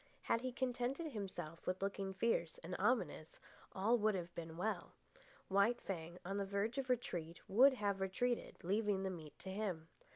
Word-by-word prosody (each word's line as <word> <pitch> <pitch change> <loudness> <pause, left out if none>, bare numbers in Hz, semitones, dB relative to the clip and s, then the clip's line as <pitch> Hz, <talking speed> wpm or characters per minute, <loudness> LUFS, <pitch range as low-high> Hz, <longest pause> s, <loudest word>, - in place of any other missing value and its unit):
Had 230 - +2
he 255 0 -2
contented 260 +5 -1
himself 190 - -5
with 185 0 0
looking 195 0 -1
fierce 190 -5 +1
and 180 +2 -4
ominous, 190 -8 +1 0.3
all 225 +5 +3
would 215 -1 +3
have 175 -1 -4
been 165 -1 -6
well. 215 +5 -2 0.5
White 200 +5 +4
Fang, 170 -2 -4
on 195 +2 -1
the 200 - +1
verge 205 +6 0
of 260 -1 -3
retreat, 175 -9 -1
would 260 +7 +7
have 200 -5 0
retreated, 235 +6 0
leaving 200 +1 +2
the 190 - 0
meat 155 -5 -8
to 190 - -6
him. 190 -6 -2
200 Hz, 170 wpm, -39 LUFS, 180-230 Hz, 0.5 s, would